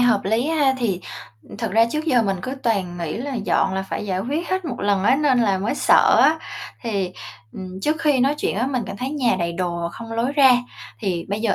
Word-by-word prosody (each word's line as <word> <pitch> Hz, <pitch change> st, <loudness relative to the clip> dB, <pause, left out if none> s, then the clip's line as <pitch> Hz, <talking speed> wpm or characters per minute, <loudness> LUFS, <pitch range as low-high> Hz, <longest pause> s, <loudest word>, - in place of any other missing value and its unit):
hợp 240 Hz, -5 st, +4 dB
lý 220 Hz, +6 st, +1 dB
ha. 295 Hz, -4 st, +2 dB
Thì 200 Hz, -7 st, -1 dB, 0.6 s
thực 225 Hz, -5 st, -2 dB
ra 225 Hz, +1 st, +5 dB
trước 305 Hz, +1 st, -2 dB
giờ 255 Hz, -7 st, +3 dB
mình 195 Hz, -3 st, 0 dB
cứ 260 Hz, -, -4 dB
toàn 195 Hz, -7 st, -1 dB
nghĩ 165 Hz, -3 st, -3 dB
là 270 Hz, +4 st, -4 dB
dọn 200 Hz, -4 st, 0 dB
là 190 Hz, -, -1 dB
phải 195 Hz, -, -5 dB
giải 185 Hz, -2 st, -1 dB
quyết 290 Hz, -, -3 dB
hết 375 Hz, 0 st, -1 dB
một 295 Hz, -, -5 dB
lần 200 Hz, -2 st, +1 dB
á, 240 Hz, +6 st, +4 dB
nên 280 Hz, -3 st, +2 dB
là 200 Hz, -4 st, +2 dB
mới 210 Hz, +7 st, -1 dB
sợ -, -, +4 dB
á, 320 Hz, +1 st, +4 dB, 0.4 s
thì, 200 Hz, -6 st, -2 dB, 0.4 s
ừm, 185 Hz, 0 st, -8 dB
trước 305 Hz, +9 st, 0 dB
khi 290 Hz, -5 st, +2 dB
nói 275 Hz, +3 st, +3 dB
chuyện -, -, -1 dB
á 240 Hz, +5 st, 0 dB
mình 260 Hz, -3 st, -1 dB
cảm -, -, -6 dB
thấy 260 Hz, +5 st, -4 dB
nhà 255 Hz, -8 st, +1 dB
đầy 170 Hz, -1 st, -1 dB
đồ 170 Hz, -1 st, -2 dB
không 230 Hz, 0 st, -8 dB
lối 235 Hz, +4 st, -1 dB
ra, 275 Hz, -3 st, +6 dB, 0.5 s
thì 180 Hz, -6 st, -2 dB
bây 205 Hz, +2 st, -2 dB
giờ 225 Hz, -2 st, +1 dB
230 Hz, 240 wpm, -22 LUFS, 190-270 Hz, 0.6 s, ra